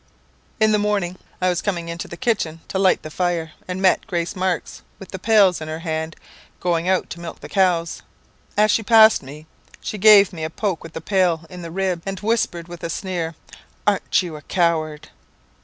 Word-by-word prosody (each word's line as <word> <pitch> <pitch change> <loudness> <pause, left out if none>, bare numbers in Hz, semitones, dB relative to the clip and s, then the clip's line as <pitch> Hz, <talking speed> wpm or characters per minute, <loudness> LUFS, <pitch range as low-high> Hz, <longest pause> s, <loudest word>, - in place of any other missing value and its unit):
"In 215 0 +4
the 210 - +3
morning, 205 -4 0 0.2
I 185 - +2
was 175 -1 0
coming 175 -5 -2
into 170 +1 -5
the 170 - -9
kitchen 170 -10 -1
to 190 - -1
light 190 -1 +3
the 155 - -8
fire, 170 -2 -1 0.2
and 180 0 -4
met 185 - +3
Grace 170 -2 -2
Marks 185 -1 -2 0.2
with 195 - -11
the 190 - -6
pails 200 -4 +4
in 155 - -5
her 160 +1 -5
hand, 160 -1 -3 0.4
going 175 0 0
out 190 -1 +1
to 170 - -6
milk 170 -1 -8
the - - -9
cows. 180 -4 +1 0.6
As 210 0 +5
she 225 - +2
passed 220 0 +6
me, 145 +3 -11 0.3
she 210 - -5
gave 205 -1 +7
me 160 -2 -6
a 155 - -2
poke 190 0 -2
with 165 - -11
the - - -6
pail 175 -3 +1
in 180 -1 -8
the 170 - -7
ribs, 185 0 -1
and 195 -1 -4
whispered 205 -6 -1
with 175 -1 -10
a 170 - -2
sneer, 170 -2 -3 0.5
'Arn't 200 -2 +2
you 170 -3 -6
a 150 - -9
coward!' 160 -2 -1
180 Hz, 205 wpm, -21 LUFS, 165-195 Hz, 0.6 s, gave